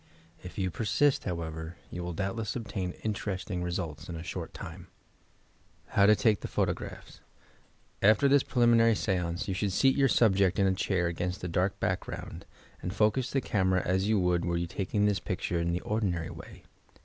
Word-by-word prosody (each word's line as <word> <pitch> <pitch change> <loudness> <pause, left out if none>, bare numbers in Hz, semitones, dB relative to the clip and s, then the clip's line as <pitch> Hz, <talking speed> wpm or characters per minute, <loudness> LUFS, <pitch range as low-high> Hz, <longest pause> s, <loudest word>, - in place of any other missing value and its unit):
If 90 -1 -10
you 95 -2 0
persist, 115 - +1
however, 80 -2 -4 0.2
you 90 - -5
will 90 0 -4
doubtless 100 +5 -3
obtain 100 -6 -3
interesting 100 -3 -3
results 85 -4 -4
in 85 - -5
a 80 - -6
short - - -5
time, - - -9 1.0
HOW 100 0 +4
TO 110 - +7
TAKE 110 -3 +2
THE - - -5
PHOTOQEAPHS - - -3 0.8
After 110 +7 +5
this 140 0 +5
preliminary 115 -2 +4
stance, 90 -4 -1
you 95 - -1
should 100 +2 -1
seat 135 +8 +3
your 135 -1 +3
subject 95 -6 +3
in 100 - +3
a 95 - +3
ehair 95 -1 0
against 90 +3 -3
a - - -1
dark 90 +3 0
background, - - -4 0.3
and 90 - -3
focus 110 +5 +2
the 135 - 0
camera 95 -5 +1
as 95 +2 +1
you 110 -1 +3
would 90 -1 +1
were 85 0 0
you 85 - -1
taking 100 +4 -1
his 100 -2 +2
picture 85 +1 -2
in 85 0 0
the 90 - -1
ordinary 95 -7 -1
way. - - -11
95 Hz, 180 wpm, -29 LUFS, 90-110 Hz, 1.0 s, TO